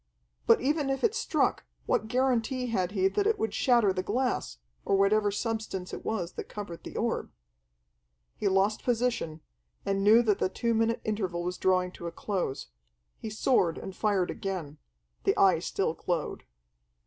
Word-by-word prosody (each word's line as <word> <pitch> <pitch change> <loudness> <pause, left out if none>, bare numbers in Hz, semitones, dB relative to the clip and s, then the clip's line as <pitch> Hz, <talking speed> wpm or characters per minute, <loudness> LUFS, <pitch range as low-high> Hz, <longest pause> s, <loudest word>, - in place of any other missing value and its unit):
But - - +6
even 290 +2 +1
if 270 0 -1
it 450 - +3
struck, 465 - 0 0.2
what 220 - +1
guarantee 255 0 +1
had 195 -6 -1
he 190 -2 +3
that 410 - +1
it 440 - +2
would 220 -2 -2
shatter 235 -6 +3
the 185 - -1
glass, 245 - -1 0.3
or 195 - +2
whatever 205 +1 +3
substance 210 -3 -3
it - - -6
was 185 -6 -2
that - - -6
covered 200 -5 -7
the - - -7
orb? - - -1 1.1
He - - -1
lost 195 +2 +2
position, 235 -10 -1 0.4
and 195 0 0
knew 220 +4 +7
that 210 -3 +2
the - - +1
two 235 +4 -1
minute 225 +1 +1
interval 190 -5 -2
was 180 +1 -3
drawing 185 -1 +2
to 170 - -7
a - - -4
close. 175 - -3 0.5
He 220 - -5
soared 210 -6 +2
and 190 - -7
fired 200 -4 +1
again. 170 -7 -5 0.4
The - - +2
Eye 185 -4 +5
still 180 0 -1
glowed. 170 -2 -3
205 Hz, 170 wpm, -29 LUFS, 185-230 Hz, 1.1 s, knew